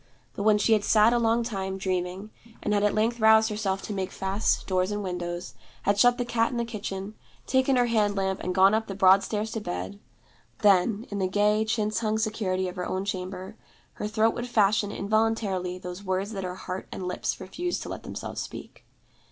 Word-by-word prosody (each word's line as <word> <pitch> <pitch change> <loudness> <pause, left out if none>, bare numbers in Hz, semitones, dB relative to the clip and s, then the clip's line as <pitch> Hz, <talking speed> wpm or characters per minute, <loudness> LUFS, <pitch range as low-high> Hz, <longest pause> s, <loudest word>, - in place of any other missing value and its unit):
But - - -5
when 210 0 +4
she 215 +2 +3
had 210 -2 +2
sat 220 +2 +5
a 240 - +3
long 230 0 +2
time, 190 -4 -3
dreaming, 185 +2 -3 0.3
and 210 - 0
had 205 - +2
at 210 0 +2
length 230 +3 +1
roused 220 0 +5
herself 195 -2 -2
to 210 - -4
make 190 -2 -3
fast 195 +2 0
doors 185 0 +1
and 205 0 -3
windows, 175 -1 -4 0.3
had 200 +1 +2
shut 245 +2 +5
the 245 - -1
cat 230 -1 +1
in 245 - -4
the 235 - 0
kitchen, 205 -3 -5 0.3
taken 260 +1 +2
her 245 -1 +4
hand 215 -3 +1
lamp 190 -1 0
and 180 0 -3
gone 190 +2 +6
up 220 +1 0
the 195 - -5
broad 190 0 +6
stairs 215 +1 -3
to 225 - -3
bed 95 - -5 0.6
then, 205 +2 +4
in 205 - -3
the 190 - +1
gay 210 +3 +2
chintz 215 -1 0
hung 215 -1 0
security 205 -4 -1
of 180 - -7
her 180 - -3
own 190 +1 -2
chamber, 185 +1 -5 0.4
her 210 - -4
throat 220 +1 +2
would 240 - -4
fashion 210 -3 +2
involuntarily 205 -4 0
those 180 +1 -8
words 190 +2 -2
that 195 -3 -4
her 180 0 -4
heart 185 0 -6
and 185 - -5
lips 180 - -2
refused 350 - -3
to - - -8
let - - -6
themselves - - -6
speak. - - -9
205 Hz, 210 wpm, -27 LUFS, 190-220 Hz, 0.6 s, gone